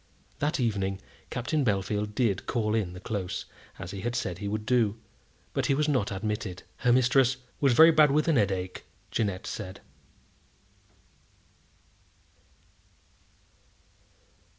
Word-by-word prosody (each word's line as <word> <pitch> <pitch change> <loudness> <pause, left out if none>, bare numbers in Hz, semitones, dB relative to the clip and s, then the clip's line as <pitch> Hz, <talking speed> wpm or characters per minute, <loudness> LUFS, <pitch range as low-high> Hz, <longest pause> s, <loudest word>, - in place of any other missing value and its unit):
That 145 +1 0
evening 100 -5 0 0.3
Captain 130 +5 -1
Bellfield 105 -1 -1
did 110 -7 0
call 110 -3 0
in 100 -6 0
the 90 - -8
Close, 100 -3 -4 0.3
as 85 - -7
he 100 -1 -6
had 120 +3 -2
said 90 -8 -2
he 100 - -4
would 105 +1 -3
do, 115 -3 +2 0.6
but - - 0
he 135 - +3
was 150 +2 +1
not 130 -9 +1
admitted. 105 -1 -3
"Her 125 - +2
mistress 130 +1 +4 0.2
was 135 -3 +4
very 160 +6 +8
bad 155 -2 +6
with 150 +3 +2
a 165 - +4
headache," 95 -6 0 0.3
Jeannette 100 -4 -1
said. 95 -2 -6
110 Hz, 130 wpm, -28 LUFS, 100-125 Hz, 0.6 s, very